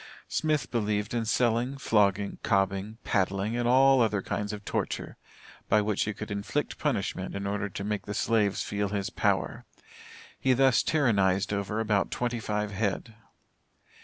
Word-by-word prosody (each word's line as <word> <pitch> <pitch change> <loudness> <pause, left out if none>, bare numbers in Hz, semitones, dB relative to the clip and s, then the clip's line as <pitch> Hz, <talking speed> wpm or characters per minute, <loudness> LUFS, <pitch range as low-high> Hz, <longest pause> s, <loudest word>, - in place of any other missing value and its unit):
Smith 155 -2 0
believed 105 -2 -1
in 115 -1 0
selling, 120 +3 +1
flogging, 100 -5 +1
cobbing, 100 +2 0
paddling, 100 +2 0
and 120 0 0
all 135 +1 +6
other 105 -4 +1
kinds 105 0 -3
of 105 -1 -7
torture, - - -3 0.5
by 105 - +5
which 105 -1 0
he 105 - -1
could 105 +1 -7
inflict 100 0 -2
punishment - - -2
in 100 0 -4
order 100 0 -2
to 100 - -6
make 105 0 -3
the 105 - -4
slaves 105 -4 +1
feel 100 -1 -2
his 100 -1 -2
power. - - 0 0.8
He 130 - +3
thus 135 -1 +4
tyrannized 100 -9 +2
over 100 +2 -2
about 105 -3 +1
twenty 120 -1 -2
five 105 -1 -2
head. 105 +2 -2
105 Hz, 155 wpm, -28 LUFS, 100-115 Hz, 0.8 s, all